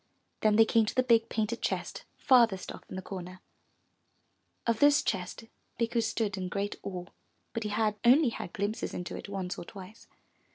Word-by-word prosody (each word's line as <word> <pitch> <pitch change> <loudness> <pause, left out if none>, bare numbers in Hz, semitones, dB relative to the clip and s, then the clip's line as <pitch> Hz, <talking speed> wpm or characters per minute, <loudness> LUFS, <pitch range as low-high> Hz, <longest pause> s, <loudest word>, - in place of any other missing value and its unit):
Then 215 -1 +3
they 225 +1 +7
came 225 -1 +3
to - - -3
the 255 - +3
big 230 -2 +3
painted 220 +1 -1
chest - - -3
farthest 235 -8 +4
off - - -10
in - - -7
the 190 - -5
corner. 185 -1 -7 1.3
Of 230 -2 +1
this 290 0 +5
chest 185 +4 -3 0.4
Bikku 230 0 +1
stood 220 -2 -1
in 185 -1 -3
great 200 +1 -2
awe, 180 -2 -5 0.5
but 230 - -2
he 210 - -2
had 210 0 0
only 255 +3 +6
had 200 - -6
glimpses 205 +3 -3
into 180 - -5
it - - -8
once 190 -2 -4
or - - -6
twice. 200 +5 -12
215 Hz, 180 wpm, -30 LUFS, 190-230 Hz, 1.3 s, they